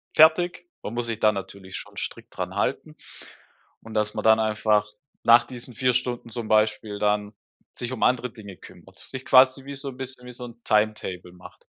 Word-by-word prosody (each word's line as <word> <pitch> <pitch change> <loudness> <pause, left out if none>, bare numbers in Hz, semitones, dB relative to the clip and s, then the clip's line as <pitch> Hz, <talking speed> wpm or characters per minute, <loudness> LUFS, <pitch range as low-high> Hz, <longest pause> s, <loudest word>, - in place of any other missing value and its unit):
fertig. 175 +3 +5 0.2
Man 110 - -5
muss 120 0 -2
sich 115 -2 -3
dann 110 -1 +4
natürlich 95 -1 -8
schon - - -11
strikt - - -7
dran - - -4
halten. - - -2 0.9
Und 110 -1 -11
dass 105 0 0
man - - -4
dann 110 0 +6
einfach 110 -1 +2 0.4
nach 115 +1 +7
diesen 125 -1 -10
4 125 +1 +2
Stunden 120 -1 -2
zum 115 -1 -5
Beispiel 105 -1 +1
dann 105 0 0 0.4
sich 120 +1 -4
um 125 - -3
andere 125 -1 +2
Dinge 100 -5 -11
kümmert. - - -16
Sich 130 -1 -7
quasi 130 +1 +5
wie 140 0 -6
so 140 +1 -8
'n 130 - -10
bisschen 130 -1 -8
wie 125 - -9
so 125 +1 -8
'n 120 -1 -12
Timetable 105 -4 0
macht. 90 0 -15
115 Hz, 195 wpm, -25 LUFS, 105-125 Hz, 0.9 s, nach